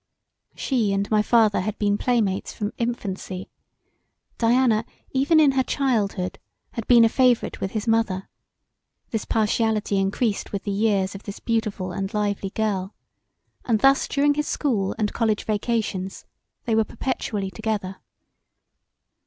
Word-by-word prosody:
She 230 -7 0
and 200 0 0
my 215 -1 +4
father 220 -2 +3
had 215 +3 -3
been 205 -1 +1
playmates 210 -4 0
from 205 0 -4
infancy: 195 -5 -4 0.9
Diana, 235 -1 +3 0.3
even 280 +5 +3
in 295 -3 +6
her 265 -1 +2
childhood 215 -9 -1 0.3
had 230 - -5
been 235 -2 +7
a - - +6
favourite 250 0 +2
with 190 - -3
his 215 -1 -3
mother; 225 -4 +1 0.8
this 225 - -2
partiality 220 -2 +1
encreased 200 +2 -1
with 200 - -3
the 205 - -2
years 200 -2 +1
of 195 - -8
this 200 -1 -8
beautiful 215 -5 -2
and 195 +2 -3
lively 205 -2 -1
girl 195 -2 -2 0.7
and 220 -4 +1
thus 270 0 +4
during 290 0 +2
his 300 +1 -2
school 210 -10 0
& 210 - -3
college 220 -3 0
vacations 210 -3 -2 0.4
they 235 - 0
were 220 0 +4
perpetually 210 -4 -3
together. 210 -3 -3
215 Hz, 140 wpm, -24 LUFS, 195-235 Hz, 0.9 s, been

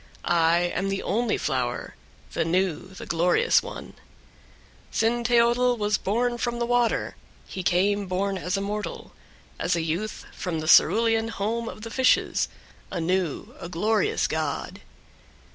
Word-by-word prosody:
I 165 0 +3 0.2
am 195 +2 -1
the 195 0 -2
only 230 0 0
flower, 125 -2 -2 0.4
the - - +1
new, 180 +1 0
the 190 0 -10
glorious 180 - +3
one. - - -9 1.0
4. - - -24 0.2
Cinteotl 240 +1 +2
was 210 -1 +1
born 240 +4 0
from 240 -1 -1
the 235 - 0
water; 245 -1 +1 0.3
he 190 - -6
came 195 +3 +1
born 195 +2 -1
as 185 +1 -2
a - - -2
mortal, 210 +1 -5 0.5
as 175 - +1
a 170 - 0
youth, 170 +7 -3
from 180 -3 -3
the 155 - -5
cerulean 225 +5 +5
home 230 +1 -2
of 215 - -10
the 230 - -7
fishes, 260 +1 +2 0.4
a 185 - -4
new, 175 -2 -1
a 170 - -7
glorious 220 - +1
god. - - -3
200 Hz, 145 wpm, -25 LUFS, 180-235 Hz, 1.0 s, cerulean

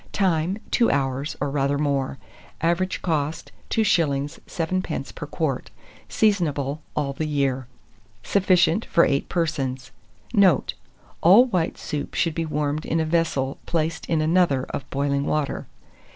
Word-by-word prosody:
Time. 180 -1 +1
2 235 - +3
hours, 135 +1 -1
or 140 0 -1
rather 140 0 +1
more. 140 -2 -1 0.4
Average 175 +3 0
cost, 155 -2 -2 0.2
2s. 155 -8 +1
7d. 185 +2 -3
per - - -7
quart. - - -2 0.4
Seasonable 155 -9 +1 0.2
all 140 -2 -1
the 155 +3 -3
year. 135 -4 0 0.6
Sufficient 185 0 +3
for 170 - +4
8 140 0 0
persons. 140 -7 -2 0.4
Note. 190 - +4 0.5
All 200 +9 +8
white 180 -9 -1
soups 145 -2 -5
should 165 - +1
be 165 +1 -2
warmed 150 0 -1
in 165 - 0
a 160 - +1
vessel 155 -5 0
placed 165 0 -1
in 160 -2 +1
another 155 -4 +3
of - - -5
boiling 140 0 0
water. 150 -2 -1
155 Hz, 135 wpm, -24 LUFS, 140-170 Hz, 0.6 s, All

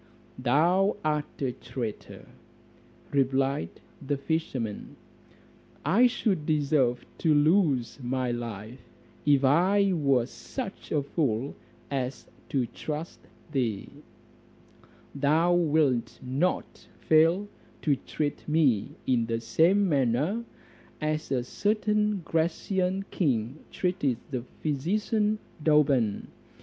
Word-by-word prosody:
"Thou 170 +11 +3
art 150 -1 -1
a 130 - +1
traitor," 120 -3 -7 0.8
replied 135 - +1 0.3
the 145 +1 -1
fisherman, 135 -7 -3 0.9
"I 210 - +5
should 205 -10 -1
deserve 140 -5 +1
to 155 -2 +3
lose 145 - +2
my 125 0 -1
life, 115 0 -6 0.5
if 140 -2 +5
I 190 +7 +4
were 140 -7 +2
such 235 - -7
a 145 -2 +1
fool 135 -3 -1 0.4
as 130 -1 -3 0.2
to 130 -3 +1
trust 155 +7 -6 0.3
thee: 120 -8 -1 1.2
thou 155 +5 +3
wilt 150 -9 +2
not 135 +8 -2 0.2
fail 165 +6 +4 0.4
to 145 -3 +3
treat 145 +2 -4
me 145 -10 +2
in 120 -3 +1
the 115 0 -1
same 185 - +3
manner 145 - +1 0.6
as 155 -1 -2
a 125 -2 +1
certain 210 - 0
Grecian 180 +4 0
king 130 - 0
treated 180 -9 0
the 130 -3 -2 0.2
physician 210 +8 0 0.3
Douban. 140 -9 +3
145 Hz, 100 wpm, -28 LUFS, 125-175 Hz, 1.2 s, I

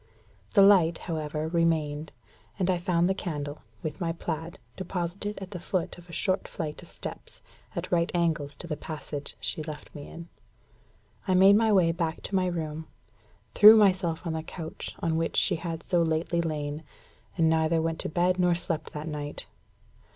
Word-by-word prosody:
The 200 - +8
light, 175 -5 +6
however, 155 -2 -3
remained; 160 -3 0 0.5
and 185 -2 +2
I 180 - 0
found 175 0 +2
the 190 - +2
candle, 150 -6 -5 0.2
with 155 +1 -5
my 165 -1 0
plaid, 165 0 -5 0.2
deposited 190 +2 -3
at 190 0 -8
the 180 - -5
foot 175 0 -2
of 175 0 -17
a - - -9
short 185 +2 0
flight 155 -3 -5
of - - -14
steps, - - -8 0.3
at - - -4
right 170 -1 +2
angles 155 -4 0
to 175 - -4
the 155 - -2
passage 150 -4 -5
she 110 +9 -2
left 150 -1 -8
me 145 - -8
in. 170 0 -9 1.0
I 185 - +3
made 195 +2 +7
my 220 0 +4
way 180 -5 +5
back 165 -1 -3
to 200 - -3
my 185 -1 +2
room, 160 -2 -4 0.7
threw 215 +1 +10
myself 185 -5 +2
on 165 - -1
the 160 - -2
couch 160 0 -7
on 165 -1 +1
which 165 0 -1
she - - +3
had 165 -1 -5
so 175 -2 +2
lately 165 +1 +1
lain, 150 -2 -3 0.6
and 165 -2 +4
neither 160 0 +3
went 165 0 -1
to - - -3
bed 180 +3 +1
nor 180 -1 +4
slept 165 -2 -3
that 150 +1 -5
night. 150 -1 -5
165 Hz, 180 wpm, -28 LUFS, 155-180 Hz, 1.0 s, threw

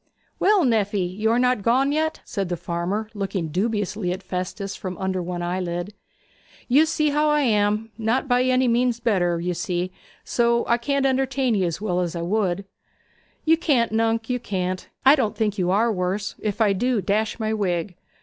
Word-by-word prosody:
'Well, 405 -2 +4
nephy, 205 -5 +1
you 215 +2 0
are 230 - +3
not 250 -3 +2
gone 260 +6 +2
yet?' 315 +1 -1
said 195 -3 -3
the 175 - -2
farmer, 175 +5 -3
looking 195 -5 -3
dubiously 205 +1 -1
at 190 +2 -5
Festus 190 +2 -4
from 185 -2 -6
under 190 -1 -2
one 175 0 -4
eyelid. 175 +2 -3 0.7
'You 290 +6 +5
see 305 -2 +1
how 300 +1 +2
I 300 0 +3
am. 215 -2 +1
Not 230 +5 0
by 250 -1 +3
any 255 0 +3
means 240 0 +2
better, 175 -7 +1
you 180 +1 -1
see; 175 +1 -2 0.3
so 235 0 +1
I 235 - +3
can't 280 +3 0
entertain 265 -1 +1
'ee 195 -3 +1
as 170 -1 -2
well 180 -4 0
as 175 -1 -2
I 170 - -3
would.' 195 0 0 0.8
'You 325 +1 +5
can't, 270 -9 +2
nunc, 225 0 +1
you 250 -1 -1
can't. 185 -4 -3 0.2
I 270 - +9
don't 225 -8 +1
think 210 -2 0
you 180 -1 +1
are 220 +5 +3
worse 190 +2 -2
if 210 +1 -3
I 205 -2 +4
do, 245 +4 +1
dash 210 +4 -1
my 220 0 -1
wig. 180 -3 -1
210 Hz, 190 wpm, -23 LUFS, 185-245 Hz, 0.8 s, I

